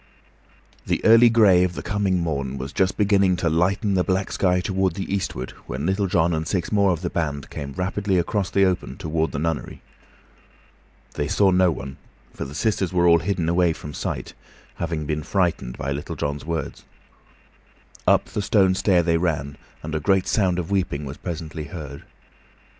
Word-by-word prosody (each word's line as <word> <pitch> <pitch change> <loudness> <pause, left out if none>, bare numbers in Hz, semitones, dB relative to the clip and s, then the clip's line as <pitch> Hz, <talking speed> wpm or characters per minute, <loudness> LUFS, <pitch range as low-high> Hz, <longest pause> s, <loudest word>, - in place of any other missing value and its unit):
The - - -1
early 115 +2 +7
gray 105 -6 +5
of 90 -1 -1
the - - -6
coming 100 -2 0
morn 70 -5 -2
was 65 +2 -6
just 95 -1 +1
beginning 100 -3 +3
to 85 -1 0
lighten 95 +5 +1
the 90 -1 +2
black 95 +1 -1
sky 90 -1 +2
toward 95 -1 0
the 95 0 -4
eastward 65 -10 -3 0.2
when 70 +3 -4
Little 95 +2 +1
John 85 -2 +2
and 80 0 -2
six 90 -4 -2
more 100 -2 +3
of 85 -3 0
the 90 - -1
band 75 -4 -3
came 70 -2 -6
rapidly 95 +3 -1
across 95 +2 0
the 100 0 +3
open 90 -1 -2
toward 80 -3 -1
the - - -4
nunnery. 80 +2 -3 1.3
They 75 - -2
saw 95 +5 +3
no 90 0 +4
one, 70 -4 -5 0.4
for - - -5
the 70 +2 -9
sisters 100 -2 0
were 90 -1 +3
all 85 0 +6
hidden 85 -1 -1
away 85 0 +3
from 75 -1 -9
sight, - - -4 0.4
having 80 -2 -3
been 75 0 -2
frightened 85 -8 -1
by 70 - -3
Little 70 +1 -4
John's 70 0 -3
words. 80 0 -4 1.2
Up - - +4
the - - -4
stone 95 -2 +3
stair 95 -2 +2
they 85 -1 +2
ran, 75 -5 -1 0.3
and 80 +1 -5
a 80 - 0
great 95 +3 +2
sound 95 -5 +1
of 90 +1 -4
weeping 90 -7 -1
was 70 +2 -7
presently 80 -2 -6
heard. 70 -2 -8
85 Hz, 185 wpm, -23 LUFS, 75-95 Hz, 1.3 s, early